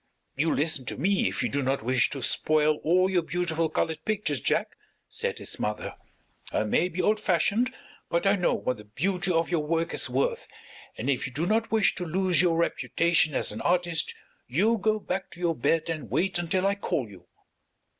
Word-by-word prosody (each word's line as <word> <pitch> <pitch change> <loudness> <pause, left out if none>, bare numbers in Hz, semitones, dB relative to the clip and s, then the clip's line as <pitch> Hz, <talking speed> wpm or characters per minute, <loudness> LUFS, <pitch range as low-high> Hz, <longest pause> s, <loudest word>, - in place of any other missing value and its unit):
"You 155 +4 +1
listen 150 -3 0
to - - -4
me 190 +7 +2
if - - -2
you - - 0
do 140 - 0
not 135 -2 -1
wish 130 +1 +2
to 135 -3 -5
spoil 155 +2 +2
all 180 +5 +3
your 185 -2 +2
beautiful 165 0 -1
colored 160 -1 -2
pictures, 210 - -1
Jack," - - 0 0.4
said - - -3
his - - -5
mother. 105 0 -3 0.6
"I - - +1
may 135 +12 +1
be 180 +1 -2
old 215 0 +2
fashioned, 210 +6 +1 0.4
but 170 +3 0
I 195 +1 +5
know 180 -3 +1
what 125 - -2
the 105 - -11
beauty 180 - -1
of 165 0 +1
your 165 -3 +1
work 165 +2 -1
is - - +2
worth, - - -1 0.5
and - - -4
if 140 0 0
you - - -9
do 155 +6 -1
not 225 +3 +1
wish 220 -2 +3
to 180 - -5
lose 180 +1 +2
your 170 -2 +2
reputation 170 -2 +1
as - - 0
an 105 - -6
artist 170 -3 +1 0.3
you 210 - +2
go 215 +2 +2
back 190 -2 -4
to 175 - -14
your 170 -2 +1
bed 165 +1 +1
and 160 -2 -4
wait 185 -1 0
until 180 +2 0
I 200 - +3
call 170 - -2
you." 90 -4 -15
170 Hz, 205 wpm, -27 LUFS, 150-190 Hz, 0.6 s, I